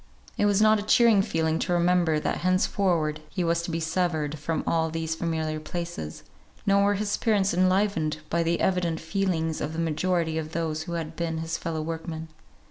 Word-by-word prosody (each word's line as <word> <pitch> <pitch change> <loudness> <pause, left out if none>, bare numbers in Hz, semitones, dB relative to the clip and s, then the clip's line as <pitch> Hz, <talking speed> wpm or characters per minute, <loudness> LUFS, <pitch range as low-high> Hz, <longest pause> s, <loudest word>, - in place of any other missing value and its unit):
It 205 - +2
was 205 +1 +3
not 215 0 +5
a - - -2
cheering 215 0 +5
feeling 160 -3 0
to 180 - 0
remember 175 -2 +3
that - - -1
henceforward 180 -4 +1
he 185 - -2
was 170 0 +1
to 170 - -5
be 165 0 -1
severed 160 -3 -1
from 160 +2 -2
all 160 -1 +1
these 160 0 -2
familiar 160 -2 -2
places; 170 - -6 0.4
nor 200 0 +4
were 205 - +3
his 205 +1 -2
spirits 200 -4 +2
enlivened 185 -4 +2
by 170 +2 0
the 165 0 0
evident 175 -3 +1
feelings 165 -2 -1
of 150 +1 -3
the 160 - -4
majority 165 0 0
of 155 0 -6
those 160 -2 -2
who 170 +2 -5
had 165 -1 -4
been 165 -1 -2
his 160 0 -3
fellow 160 -2 -3
workmen. 160 0 -5
165 Hz, 190 wpm, -26 LUFS, 160-185 Hz, 0.4 s, not